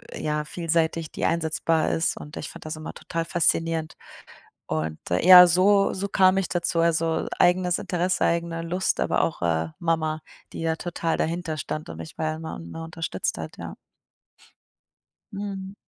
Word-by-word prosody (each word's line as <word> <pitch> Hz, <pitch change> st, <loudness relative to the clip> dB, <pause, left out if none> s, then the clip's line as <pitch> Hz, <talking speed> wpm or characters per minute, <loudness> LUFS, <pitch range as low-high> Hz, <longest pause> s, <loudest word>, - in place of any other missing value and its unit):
ja, 150 Hz, 0 st, -2 dB
vielseitig, 165 Hz, -1 st, -1 dB
die -, -, -3 dB
einsetzbar 165 Hz, -1 st, +1 dB
ist, 165 Hz, -, 0 dB
und 150 Hz, -, -9 dB
ich 145 Hz, -, -5 dB
fand -, -, -12 dB
das 155 Hz, -, -4 dB
immer 155 Hz, 0 st, -7 dB
total 165 Hz, 0 st, -4 dB
faszinierend. 165 Hz, -1 st, 0 dB, 0.7 s
Und 80 Hz, 0 st, -2 dB, 0.2 s
ja, 180 Hz, 0 st, +10 dB
so 195 Hz, +3 st, +4 dB
so 200 Hz, +1 st, -3 dB
kam 190 Hz, -1 st, +4 dB
ich 195 Hz, -, -1 dB
dazu. 170 Hz, -1 st, 0 dB
Also 165 Hz, -1 st, +1 dB
eigenes 180 Hz, 0 st, +3 dB
Interesse, 180 Hz, +1 st, 0 dB
eigene 170 Hz, 0 st, 0 dB
Lust, 180 Hz, +3 st, -1 dB
aber -, -, +1 dB
auch, 160 Hz, -, -2 dB
äh, 80 Hz, -1 st, +1 dB
Mama, 160 Hz, -2 st, 0 dB, 0.3 s
die -, -, -6 dB
ja 160 Hz, 0 st, 0 dB
total 170 Hz, -1 st, -2 dB
dahinterstand 160 Hz, -2 st, -3 dB
und 80 Hz, -, -8 dB
mich 80 Hz, -, -9 dB
ja 155 Hz, 0 st, -1 dB
immer, 160 Hz, 0 st, -7 dB
ne, 85 Hz, -, -8 dB
unterstützt 165 Hz, 0 st, -3 dB
hat, -, -, -7 dB
ja. -, -, -7 dB, 1.6 s
Mhm. 195 Hz, -1 st, -5 dB
165 Hz, 155 wpm, -25 LUFS, 155-180 Hz, 1.6 s, ja